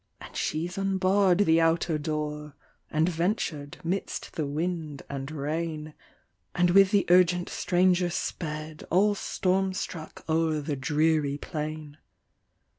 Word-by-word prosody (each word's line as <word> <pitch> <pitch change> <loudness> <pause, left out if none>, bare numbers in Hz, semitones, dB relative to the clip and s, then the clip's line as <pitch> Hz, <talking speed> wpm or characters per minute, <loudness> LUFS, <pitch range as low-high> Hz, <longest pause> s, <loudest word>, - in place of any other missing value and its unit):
And - - -12
she's 170 +5 -2
unbarr'd 195 -1 +3
the 160 -1 +4
outer 165 -1 +2
door, 150 -1 -4 0.3
And 155 +1 +2
ventur'd 165 -4 -2
'midst 185 +4 -3
the 155 -3 -2
wind 155 -1 -3
and 135 0 -4
rain, 155 +1 -3 0.6
And 175 0 +3
with 195 +1 +7
the 200 -1 +3
urgent 180 0 +4
stranger 180 0 +2
sped, 155 -3 -4
All 200 +4 +4
storm 190 -1 0
struck 160 -4 -6
o'er 160 -1 +1
the 145 0 -3
dreary 150 +1 +1
plain. 150 -1 -5
165 Hz, 120 wpm, -27 LUFS, 150-180 Hz, 0.6 s, with